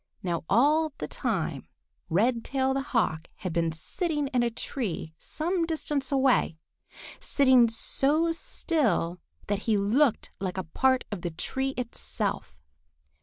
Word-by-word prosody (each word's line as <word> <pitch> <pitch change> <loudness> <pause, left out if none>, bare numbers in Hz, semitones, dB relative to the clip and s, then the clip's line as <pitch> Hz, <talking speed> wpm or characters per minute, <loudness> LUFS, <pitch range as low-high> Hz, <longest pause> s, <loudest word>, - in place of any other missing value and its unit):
_] - - -51 0.2
Now 170 -2 -1
all 300 +7 +3
the - - -4
time, - - -2 0.4
Redtail 250 +7 +1
the 270 - 0
Hawk 215 - 0
had 185 -3 -5
been 165 -1 +1
sitting 295 - -2
in 255 -3 +1
a 240 - +2
tree 220 - -4
some 345 +3 -1
distance 300 -4 -2
away, 265 - +3 0.6
sitting 260 -4 +4
so 290 +8 +2
still 280 - 0 0.3
that 205 -1 -1
he 215 - +4
looked 225 +5 +2
like 190 -1 -3
a 185 - -1
part 260 +10 +1
of 200 -4 -4
the 175 - -2
tree 265 +11 -2
itself. 235 - -3
250 Hz, 135 wpm, -28 LUFS, 190-285 Hz, 0.6 s, sitting